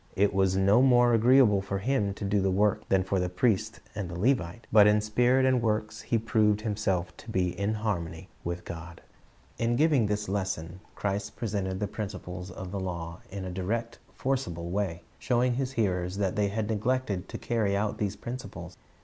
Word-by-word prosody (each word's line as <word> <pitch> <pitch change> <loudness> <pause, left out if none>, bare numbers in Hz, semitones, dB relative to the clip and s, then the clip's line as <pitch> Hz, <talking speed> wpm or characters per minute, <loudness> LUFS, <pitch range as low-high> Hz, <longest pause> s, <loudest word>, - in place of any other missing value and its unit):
It 100 +1 +3
was 95 -1 +2
no 100 +5 +5
more 120 -2 +5
agreeable 115 -3 +5
for 100 0 -3
him 100 -2 0
to 100 - -5
do 100 0 +2
the 95 - +2
work 100 +2 +1
than 95 -1 +3
for 95 0 0
the 90 0 0
priest 110 +3 0
and 105 -4 -4
the 85 - -5
Levite, 105 -2 0
but 105 -1 +7
in 105 0 +5
spirit 125 +5 +3
and 130 -2 +3
works 110 -1 -1
he 115 - 0
proved 110 -2 +2
himself 100 -5 -1
to - - -12
be 95 -4 +1
in 100 +4 -1
harmony 85 -7 -3 0.2
with 85 +1 -4
God, 85 0 -8 0.6
In 115 +1 +1
giving 145 -5 +3
this 105 0 -1
lesson, 95 -3 -3 0.2
Christ 100 0 -3
presented 100 -5 -2
the 105 - 0
principles 95 -3 -6
of 95 0 -7
the 100 - -3
law 85 -2 -5
in 95 -1 -6
a 90 - -4
direct, 115 +6 -3
forcible 85 -11 -2
way, 90 -4 -2 0.2
showing 125 -1 +2
His 130 +1 -2
hearers 90 -5 0
that 95 -2 0
they 105 -1 +2
had 105 +1 -2
neglected 110 -3 -1
to - - -5
carry 105 -4 0
out 105 +1 -1
these 105 -1 -1
principles. 125 +4 -7
100 Hz, 190 wpm, -28 LUFS, 95-115 Hz, 0.6 s, but